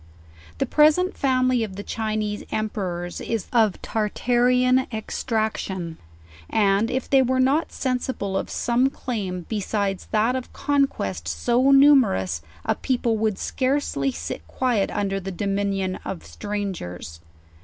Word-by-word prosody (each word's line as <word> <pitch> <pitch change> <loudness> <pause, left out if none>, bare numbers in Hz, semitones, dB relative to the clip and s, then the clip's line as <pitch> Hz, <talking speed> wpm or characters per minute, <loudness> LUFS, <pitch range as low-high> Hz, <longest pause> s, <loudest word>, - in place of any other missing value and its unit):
The - - +1
present 310 +5 +4
family 255 -3 +2
of 200 -4 -5
the 205 - -6
Chinese 215 -2 -2
emperors 185 -5 -3
is 225 -4 -2
of 220 -5 +3
Tartarian 250 +4 +2
extraction; 215 -6 -3 0.5
and 205 +1 +2
if 260 0 -2
they 270 -1 +5
were 260 0 +1
not 275 +5 +2
sensible 250 -6 -2
of - - -2
some 245 +2 +1
claim 200 -9 -4
beside 200 -2 -1
that 220 +4 +2
of 255 -1 -5
conquest 185 - 0
so 235 - +2
numerous 260 - +5 0.2
a - - +2
people 240 -3 0
would 215 -3 0
scarcely 255 - 0
sit 80 -7 -5
quiet 240 -6 0
under 195 -1 -1
the 195 0 -5
dominion 195 0 -1
of 190 -4 -6
stran 205 -2 -4
gers. 90 - -8
215 Hz, 130 wpm, -24 LUFS, 195-255 Hz, 0.5 s, they